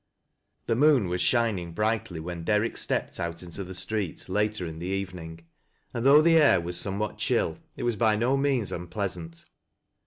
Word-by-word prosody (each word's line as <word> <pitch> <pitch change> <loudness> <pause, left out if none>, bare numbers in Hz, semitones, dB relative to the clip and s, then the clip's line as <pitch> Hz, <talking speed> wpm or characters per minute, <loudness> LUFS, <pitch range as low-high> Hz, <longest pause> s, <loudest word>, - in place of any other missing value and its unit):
The 115 - +1
moon 135 -7 +4
was 90 0 -1
shining 105 -9 +1
brightly 105 -4 -1
when 85 +1 -6
DeiTick 105 +4 +1
steppea - - -2
out 85 +1 -4
into 90 +3 -6
the 95 0 -8
street 105 -2 -2
later 105 0 0
in 80 -1 -7
the 85 - -5
evening, 90 -4 -5 0.5
and 115 - -3
though 145 +3 +7
tho 170 - +5
ail 155 - +6
was 90 +1 -4
somewhat 100 +3 -3
chill - - 0 0.2
it - - -5
was 120 -3 0
by 110 -1 +3
no 120 +5 +1
means 135 -6 0
unpleasant. 90 -2 -5
100 Hz, 175 wpm, -27 LUFS, 90-115 Hz, 0.5 s, though